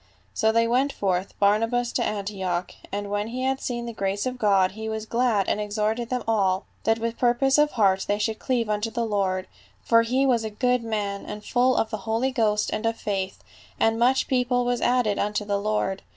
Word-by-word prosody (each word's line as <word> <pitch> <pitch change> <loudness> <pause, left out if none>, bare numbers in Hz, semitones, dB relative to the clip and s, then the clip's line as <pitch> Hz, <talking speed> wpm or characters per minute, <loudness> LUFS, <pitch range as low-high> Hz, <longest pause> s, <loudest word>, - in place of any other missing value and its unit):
" 95 +2 -36
So 220 - +2
they 230 +1 +3
sent 260 +4 +2
forth 190 -1 -2
Barnabas 230 +4 +2
to - - 0
Antioch; 190 -4 -3 0.2
and 205 0 -4
when 205 +1 -1
he 250 +3 -4
had 265 0 0
seen 240 -1 -3
the 235 - -5
grace 200 0 -2
of 255 -1 -3
God, 195 -4 +3
he 220 +2 -6
was 220 0 -4
glad 230 -4 +1
and 210 - 0
ex 210 0 -5
horted 220 +2 -1
them 250 -1 -2
all, 195 -4 +1 0.2
that 225 0 +3
with 230 0 -3
purpose 265 +3 +3
of 300 0 +3
heart 195 -4 +2
they 205 - +1
should 220 +1 -2
cleave 245 -4 0
unto 210 +1 -1
the 235 +1 -2
Lord. 190 -3 -1 0.4
For 230 -1 +5
he 255 +4 +1
was 240 -4 +2
a 220 - -3
good 250 +3 0
man, 205 -3 -3
and 210 0 -7
full 255 0 +2
of 220 - 0
the 215 - -2
Holy 235 +4 +1
Ghost 210 -4 +1
and 215 +1 -1
of 225 0 -1
faith; 195 -2 -3 0.4
and 225 0 +2
much 255 +3 +3
people 250 -1 +1
was 245 0 0
added 245 -5 +2
unto 210 0 -1
the 200 -1 0
Lord. 200 -2 -1
220 Hz, 220 wpm, -25 LUFS, 205-245 Hz, 0.4 s, For